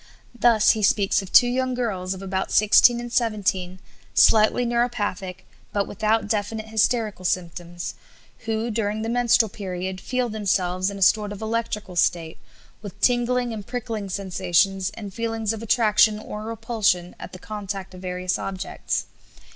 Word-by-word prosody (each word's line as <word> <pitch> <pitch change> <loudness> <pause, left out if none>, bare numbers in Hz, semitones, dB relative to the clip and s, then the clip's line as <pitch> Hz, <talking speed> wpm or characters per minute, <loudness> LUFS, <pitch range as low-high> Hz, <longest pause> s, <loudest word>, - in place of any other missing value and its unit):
Thus, 235 -3 +4
he 220 - -2
speaks 200 -1 +2
of 195 - -10
two - - +7
young 255 +1 -1
girls 190 -6 -2
of 190 - -9
about 190 0 -2
16 225 +3 +5
and 240 0 -7
17, 195 -6 0 0.4
slightly 220 +3 +5
neuropathic, 215 -6 -2 0.3
but 200 -1 0
without 215 +1 0
definite 215 +1 -2
hysterical 220 -3 0
symptoms, 175 -1 -3 0.5
who, 225 +1 -1
during 215 0 -2
the 225 - -3
menstrual 240 -1 +3
period, 185 -1 -5
feel 250 +2 -1
themselves 190 -4 0
in 200 - -7
a 195 - +1
sort 210 +2 +3
of 205 - -7
electrical 220 -3 -3
state, 165 -1 0 0.4
"with 205 -4 -10
tingling 245 0 +1
and 210 -3 -7
prickling 230 -4 -4
sensations 190 0 0
and 205 -4 -8
feelings 225 -1 -2
of 220 - -7
attraction 215 -1 +3
or 215 0 -7
repulsion 215 -5 -1
at - - -9
the 185 - -9
contact 195 -1 -6
of 180 - -11
various 180 0 -2
objects." 190 -1 -3
210 Hz, 150 wpm, -23 LUFS, 190-230 Hz, 0.5 s, two